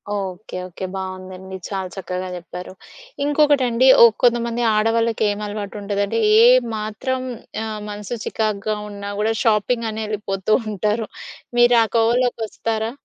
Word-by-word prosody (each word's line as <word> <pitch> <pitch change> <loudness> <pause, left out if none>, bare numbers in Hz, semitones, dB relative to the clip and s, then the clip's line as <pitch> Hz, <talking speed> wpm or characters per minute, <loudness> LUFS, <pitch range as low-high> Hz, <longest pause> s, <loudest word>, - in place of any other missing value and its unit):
Okay. 190 -1 -5
Okay. 185 +1 -6
బావుందండి. 190 0 -7
చాలా 190 -2 -3
చక్కగా 185 -1 -4
చెప్పారు. 180 +1 -8 0.5
ఇంకొకటండి 280 -4 +3
ఓ - - +11 0.2
కొంతమంది 235 -1 +2
ఆడవాళ్ళకేమలవాటుంటదంటే 210 -2 -1 0.2
ఏ - - +8 0.3
మాత్రం 220 +5 -3 0.5
ఆహ్, 215 -1 -5
మనసు 210 +3 -5
చికాగ్గా 215 -1 -1
ఉన్నా 200 0 -7
కూడా 220 +1 +1
షాపింగనెళ్ళిపోతూ 215 -3 0
ఉంటారు. 210 +2 -1 0.5
మీరు 240 0 +6
ఆ - - +1
కోవలోకొస్తారా? 225 -1 0
215 Hz, 100 wpm, -21 LUFS, 200-230 Hz, 0.5 s, ఓ